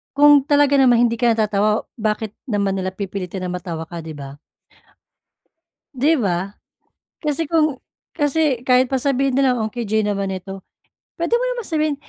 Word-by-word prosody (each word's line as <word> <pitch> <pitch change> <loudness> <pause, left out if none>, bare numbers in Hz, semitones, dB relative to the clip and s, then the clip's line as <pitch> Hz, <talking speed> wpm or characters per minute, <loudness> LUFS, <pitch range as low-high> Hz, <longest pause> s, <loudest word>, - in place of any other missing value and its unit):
Kung 290 -1 +6
talaga 285 -1 +4
naman 245 -2 +5
hindi 230 -1 -1
ka 235 -2 +3
natatawa 210 -1 +1 0.2
bakit 215 0 -1 0.2
naman 205 -4 0
nila 185 0 -2
pipilitin 190 -1 -5
na 180 - -3
matawa 170 -2 -5
ka, 170 +1 -8
'di 160 -1 -8
ba? 140 0 -10 1.6
'Di 275 +5 +2
ba? 195 0 -2 0.7
Kasi 300 +1 -1
kung 310 -5 +2 0.4
kasi 290 -4 +1
kahit 255 0 +4
pa 265 - +1
sabihin 275 0 +1
nilang, 260 -2 +2
"Ang 220 -1 -2
KJ 220 -3 -1
naman 200 -1 -1
nito," 190 +1 -7 0.6
puwede 340 +7 +1
mo 480 - 0
naman 475 -3 -5
sabihin, 310 -2 0
230 Hz, 160 wpm, -20 LUFS, 195-280 Hz, 1.6 s, Kung